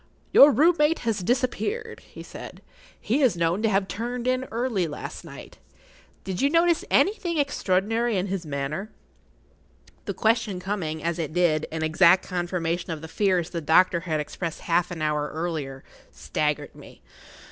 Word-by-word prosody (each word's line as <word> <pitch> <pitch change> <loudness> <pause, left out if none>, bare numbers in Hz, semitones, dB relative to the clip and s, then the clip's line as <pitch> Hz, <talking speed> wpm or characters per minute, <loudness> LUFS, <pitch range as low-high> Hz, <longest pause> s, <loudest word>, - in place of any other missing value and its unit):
"Your 285 +2 +9
room 320 +7 +4
mate 300 +2 +3
has 225 -2 0
disappeared,"[Pg 270 - -2
30] - - -23
he - - -8
said. - - -10 0.4
"He 250 +8 0
is 245 -10 +3
known 170 +4 +1
to 220 - +2
have 195 -1 +1
turned 240 +3 -4
in 255 0 +1
early 230 -7 -1
last 150 - -7
night. - - -12 0.6
Did 190 -2 -4
you 280 - +3
notice 335 +1 +3
anything 365 -5 +2
extraordinary 225 -4 0
in 185 - 0
his 195 -2 -3
manner?" 150 +6 -4 1.2
The - - -4
question 220 -4 +1
coming, 180 -5 -3
as 170 0 -1
it 155 -2 -3
did, 165 -3 +2
in 160 0 -3
exact 170 +3 +4
confirmation 175 -1 -2
of 160 -2 -4
the - - -6
fears 180 -1 0
the 170 - -3
doctor 170 +3 +4
had 165 -3 -2
expressed 165 +2 -5
half 175 +1 +1
an 170 -3 -5
hour 150 -1 0
earlier, 155 -5 -4 0.3
staggered 150 -1 -2
me. - - -15
185 Hz, 165 wpm, -25 LUFS, 165-235 Hz, 1.2 s, Your